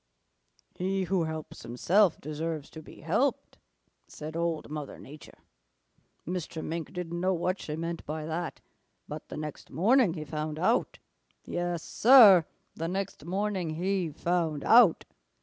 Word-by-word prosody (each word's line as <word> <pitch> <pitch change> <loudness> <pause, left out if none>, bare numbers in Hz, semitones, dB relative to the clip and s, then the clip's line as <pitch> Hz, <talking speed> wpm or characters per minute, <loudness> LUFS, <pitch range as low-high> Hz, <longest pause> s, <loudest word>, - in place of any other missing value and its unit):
"'He 190 +1 -1
who 185 -2 0
helps 160 -1 -6
himself 170 - +2
deserves 155 0 -5
to 160 - -9
be - - -14
helped,' - - -1 0.5
said 155 +1 -8
Old 170 -1 -1
Mother 150 -2 -6
Nature. 150 +2 -13 0.9
Mr. 170 -2 -4
Mink 165 0 -4
didn't 175 -2 -5
know 185 +1 +1
what 180 +3 -1
she 150 - -5
meant 165 +1 -4
by 155 +1 -4
that, 165 +2 -4 0.5
but - - -8
the - - -6
next 150 -1 -7
morning 200 - +3
he 155 -2 -6
found 155 0 -4
out. - - +1 0.5
Yes, 175 -1 -3
Sir, 215 -9 +7 0.3
the 165 - -4
next 190 -3 -4
morning 185 -3 -2
he 185 0 -1
found 160 -2 -1
out. 225 -7 +6
170 Hz, 140 wpm, -29 LUFS, 155-185 Hz, 0.9 s, Sir